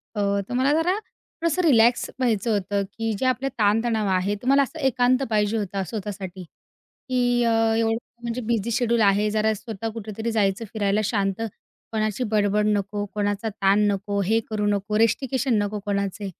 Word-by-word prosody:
अ, 210 - -2 0.3
तर - - -4
मला 260 +3 +2
जरा 325 +3 +2
थोडंसं 335 -5 -4
रिलॅक्स 240 -6 +4
व्हायचं 230 -3 +1
होतं, 200 0 0
की 225 +3 -4
जे - - -1
आपले 255 +1 +1
ताणतणाव 220 +1 +2
आहे. 190 +2 +1
तर 225 +5 -9
मला 275 +1 +5
असं 270 - -7
एकांत 255 0 +2
पाहिजे 210 0 +1
होता 195 -2 -2
स्वतःसाठी, 195 -3 -6
की 245 +7 -3
अ, 230 - +2 0.3
एवढं 225 0 +1 0.3
म्हणजे 235 +1 -3
बिझी 230 -1 -1
शेड्यूल 235 -1 +1
आहे. 205 +1 +3
जरा 220 0 +2
स्वतः 225 0 -5
कुठेतरी 220 +1 -4
जायचं 210 0 0
फिरायला. 210 -1 +1
शांत, 200 -1 -1 0.5
कोणाची 215 +1 -1
बडबड 210 0 +2
नको, 205 0 0
कोणाचा 205 +1 -1
ताण 200 0 +2
नको, 200 0 -1
हे 225 +3 +3
करू 210 -1 -1
नको, 205 +1 0
रिस्ट्रिक्शन 255 +3 +1
नको 205 0 -3
कोणाचे 200 0 -2
215 Hz, 165 wpm, -24 LUFS, 205-235 Hz, 0.5 s, मला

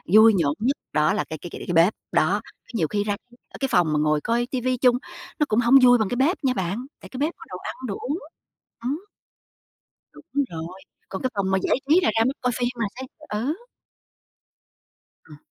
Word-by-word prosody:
vui 220 +1 +9
nhộn 145 -5 +2
nhất 260 +6 +1 0.2
đó 150 +4 +3
là 210 - 0
cái 160 - -4
cái 175 - -8
cái - - -8
cái 175 - -1
bếp. 170 +5 +5 0.2
Đó, - - +2 0.3
nhiều 170 -9 +1
khi 205 +5 -1
ra, 205 0 0 0.4
ơ, - - -11
cái 270 - +1
phòng 165 -3 +3
mà 150 - +2
ngồi 150 0 +2
coi 235 +5 0
ti 255 - -1
vi 255 +1 0
chung 245 -1 +4 0.4
nó 300 - +4
cũng 215 - +3
hổng 240 +2 +5
vui 245 0 +8
bằng 220 -4 0
cái - - -1
bếp 285 +9 +2
nha 260 -2 +2
bạn, 195 +4 -2 0.2
tại - - -11
cái 260 - -8
bếp 305 +4 0
có - - -11
đồ 180 - -6
ăn, - - -6
đồ 200 - -2
uống. 300 +7 -2 0.6
Ừm. 290 +10 -3 1.1
Đúng - - -14 0.3
rồi, 165 +3 -6 0.3
còn 190 - -5
cái 255 - 0
phòng 195 -2 0
mà 190 - +3
giải - - +2
trí 325 +5 +6
là 360 - +3
ra 225 - +4
mới 260 - +2
coi 250 - +1
phim 245 -1 +1
là 230 -3 -1
sẽ 260 - -6 0.3
ờ. 225 +7 -1 1.7
Ừm. 150 - -13
225 Hz, 225 wpm, -24 LUFS, 180-255 Hz, 1.7 s, vui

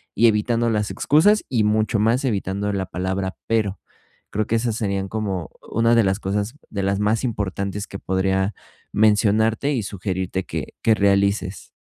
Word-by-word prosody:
y 115 +3 +5
evitando 115 +2 +2
las 105 -2 0
excusas 205 +8 +3
y, 115 -4 +2
mucho 110 0 +1
más, 115 +5 +2
evitando 100 -3 -1
la 95 -1 -1
palabra 95 +1 -3
"pero"; 105 -4 0 0.5
creo 105 0 -1
que 115 - +1
esas 115 -1 0
serían 100 -3 -2
como 100 -6 -3 0.2
una 115 +1 +2
de 115 - +5
las 95 +2 +1
cosas 105 +5 -2
de 100 -2 -3
las 100 +1 0
más 110 +3 +1
importantes 100 -2 -3
que 100 - -8
podría 95 +1 0 0.4
mencionarte 110 +5 +3
y 115 -5 -1
sugerirte 95 -1 -3
que - - -5
que 110 -1 +4
realices. 100 -1 +1
105 Hz, 160 wpm, -22 LUFS, 95-115 Hz, 0.5 s, y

